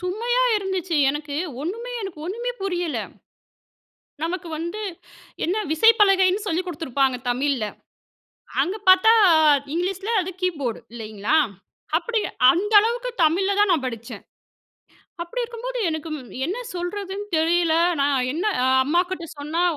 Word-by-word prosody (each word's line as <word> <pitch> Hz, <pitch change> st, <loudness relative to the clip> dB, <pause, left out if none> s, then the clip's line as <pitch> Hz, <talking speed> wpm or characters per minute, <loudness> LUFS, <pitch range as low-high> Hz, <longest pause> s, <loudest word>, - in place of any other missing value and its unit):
சுமையா 460 Hz, +7 st, 0 dB
இருந்துச்சு. 375 Hz, -4 st, -2 dB
எனக்கு 295 Hz, 0 st, -5 dB, 0.3 s
ஒண்ணுமே, 460 Hz, +9 st, -5 dB
எனக்கு 385 Hz, -5 st, -7 dB
ஒண்ணுமே 475 Hz, +7 st, -3 dB
புரியல. 355 Hz, -5 st, -2 dB, 1.2 s
நமக்கு 340 Hz, +1 st, -3 dB
வந்து 340 Hz, +6 st, -5 dB, 0.6 s
என்ன 390 Hz, +6 st, 0 dB
விசைப்பலகைன்னு 390 Hz, 0 st, +4 dB
சொல்லிக் 360 Hz, +2 st, -1 dB
குடுத்திருப்பாங்க 275 Hz, -6 st, 0 dB
தமிழ்ல. 260 Hz, -2 st, 0 dB, 1.0 s
அங்கே 390 Hz, +5 st, -3 dB
பார்த்தா 375 Hz, +4 st, +7 dB, 0.6 s
இங்கிலீஷ்ல 380 Hz, +5 st, -2 dB
அது 370 Hz, 0 st, -4 dB
கீபோர்ட் 285 Hz, -11 st, -2 dB
இல்லைங்களா? 220 Hz, +3 st, -2 dB, 0.6 s
அப்டி 455 Hz, +6 st, -1 dB, 0.3 s
அந்த 410 Hz, +5 st, -2 dB
அளவுக்கு 485 Hz, +3 st, -1 dB
தமிழ்ல 365 Hz, +5 st, +2 dB
தான் 415 Hz, -, +4 dB
நான் 310 Hz, -6 st, +1 dB
படிச்சேன், 230 Hz, -2 st, -7 dB, 1.0 s
அப்டி 470 Hz, +8 st, -4 dB
இருக்கும்போது 475 Hz, +2 st, -5 dB
எனக்கு 315 Hz, 0 st, -4 dB, 0.4 s
என்ன 380 Hz, +6 st, -3 dB, 0.2 s
சொல்றதுன்னு 390 Hz, +3 st, -4 dB
தெரியல. 330 Hz, 0 st, +2 dB, 0.3 s
நான் 280 Hz, -1 st, +2 dB, 0.2 s
என்ன 340 Hz, +7 st, -2 dB, 0.2 s
அ -, -, +3 dB, 0.2 s
அம்மாகிட்ட 345 Hz, +3 st, 0 dB
சொன்னா 310 Hz, +4 st, -1 dB
360 Hz, 115 wpm, -23 LUFS, 315-415 Hz, 1.2 s, பார்த்தா